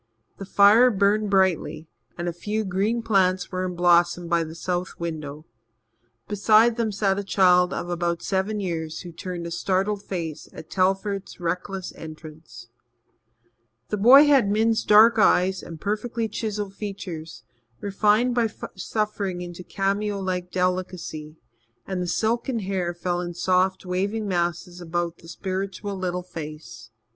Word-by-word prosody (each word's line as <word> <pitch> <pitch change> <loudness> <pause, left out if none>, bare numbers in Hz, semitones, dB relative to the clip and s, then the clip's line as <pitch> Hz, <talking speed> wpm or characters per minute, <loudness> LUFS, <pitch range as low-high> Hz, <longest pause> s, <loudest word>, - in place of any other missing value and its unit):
The 195 - -6
fire 205 +6 +6
burned 205 0 +2
brightly, 190 -4 +1 0.3
and 175 +1 -3
a 175 - -2
few 210 +5 -3
green 205 +5 0
plants 190 -4 +2
were 185 0 -2
in 180 -1 -3
blossom 175 0 +3
by 170 -1 +2
the 160 0 -8
south 180 +1 -3
window. 155 -3 -6 0.8
Beside 215 +3 +4
them 230 -2 -1
sat 195 -1 0
a - - -3
child 180 -2 +4
of - - -4
about 170 -1 -2
seven 195 +2 -1
years 165 -4 -4
who 175 - -9
turned 175 +1 -6
a 170 - -5
startled 195 +4 0
face 170 -6 -5
at 155 - -11
Telford's 195 +1 -1
reckless 180 +2 -3
entrance. 155 -7 -11 1.2
The 210 - -1
boy 255 +8 +8
had 275 -8 +4
Min's 220 +2 +2
dark 220 +2 +6
eyes 190 -1 +3
and 165 -2 -9
perfectly 220 +4 -2
chiselled 210 -2 -4
features, 185 -6 -7 0.4
refined 210 +4 +2
by 235 -2 +1 0.2
suffering 200 -1 -3
into 175 0 -8
cameo 200 +2 -1
like 180 -2 -3
delicacy, 180 -4 -3 0.5
and 190 -2 -3
the 180 - -2
silken 235 +6 0
hair 185 -3 -2
fell 175 0 -2
in 175 -1 -5
soft, 185 +2 +1
waving 200 +4 -2
masses 175 0 -2
about 170 0 -3
the 165 - -15
spiritual 195 +3 -4
little 180 -1 -3
face. 155 -7 -9
185 Hz, 145 wpm, -24 LUFS, 175-205 Hz, 1.2 s, boy